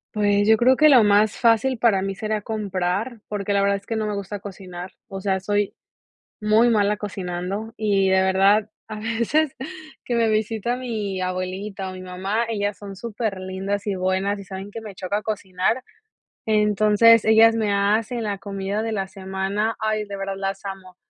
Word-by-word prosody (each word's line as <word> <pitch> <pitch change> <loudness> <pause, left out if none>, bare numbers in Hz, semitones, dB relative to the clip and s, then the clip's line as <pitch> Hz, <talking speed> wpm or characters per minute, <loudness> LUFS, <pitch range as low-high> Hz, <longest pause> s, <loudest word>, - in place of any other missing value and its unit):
Pues, 205 0 +2
yo 220 - +6
creo 255 +3 +5
que 305 0 +6
lo 250 -6 +7
más 205 +1 +3
fácil 235 +1 +3
para 200 -5 +3
mí 195 - -2
será 215 +1 -2
comprar, 205 +2 -2
porque 205 -1 -3
la 200 0 +3
verdad 200 0 +2
es 200 - -15
que 225 - -2
no 220 -1 -1
me 210 - -2
gusta 200 0 -5
cocinar, 185 -2 -8 0.2
o 195 - -6
sea, 190 -1 0
soy 205 +1 0 0.7
muy 215 +3 +4
mala 210 -2 +2
cocinando. 195 +2 -4
Y 200 -3 +2
de 190 0 +4
verdad 195 +3 +3 0.2
a 215 -1 -6
veces 235 +7 0 0.5
que 240 - -1
me 230 -1 +3
visita 220 +2 0
mi 215 -7 -3
abuelita 185 +2 -3
o - - -8
mi 185 - -8
mamá, 190 +5 -2
ellas 205 -2 -1
son 200 -1 -9
superlindas 200 -2 -3
y 200 - 0
buenas 190 +2 0
y - - -7
saben 195 +2 -8
que 225 - -6
me 210 -3 -10
choca 200 +4 -2
cocinar. 205 +3 -1 0.6
Entonces, 215 +1 +5
ellas 225 +1 +6
me 215 -3 0
hacen 215 +4 +1
la 205 -2 -2
comida 200 +1 -3
de 225 - -2
la 195 -3 -2
semana, 195 +3 -2
ay, 215 -1 -1
de 200 0 -6
verdad 195 0 -3
las 195 0 -4
amo. 190 -2 -8
205 Hz, 180 wpm, -23 LUFS, 195-220 Hz, 0.7 s, lo